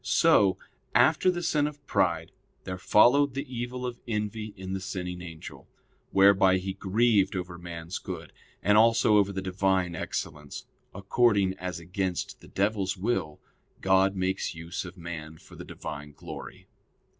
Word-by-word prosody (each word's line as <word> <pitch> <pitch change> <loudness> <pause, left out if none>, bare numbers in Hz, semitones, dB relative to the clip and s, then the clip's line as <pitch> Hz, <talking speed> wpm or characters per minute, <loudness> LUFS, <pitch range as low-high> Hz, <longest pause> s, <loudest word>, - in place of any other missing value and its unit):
So, 95 -2 +4 0.4
after 185 - +5
the 175 -1 -1
sin 150 -3 +2
of 145 -1 -9
pride, 85 -8 0 0.3
there 95 -1 -5
followed 130 +8 +4
the 140 - -3
evil 125 0 -4
of 120 -1 -5
envy 105 -1 -3
in 95 0 -6
the 95 - -2
sinning 90 -2 -5
angel, 85 -3 -10 0.4
whereby 95 -1 +5
he 95 +1 -4
grieved 100 0 +2
over 90 -1 -5
man's 85 0 -6
good, - - -7 0.3
and 105 +1 +5
also 115 -1 +5
over 100 -1 +3
the 95 -1 -4
Divine 95 -1 +1
excellence, 75 -2 -5 0.3
according 100 0 +2
as 90 -1 -4
against 90 +1 -3
the - - -14
devil's 100 -1 -1
will 90 -7 -2 0.4
God 95 +1 +3
makes 95 -2 -1
use 85 +3 -5
of 90 +1 -10
man 80 -2 -7
for - - -16
the - - -9
Divine 75 0 -8
glory. - - -10
95 Hz, 150 wpm, -28 LUFS, 90-105 Hz, 0.4 s, after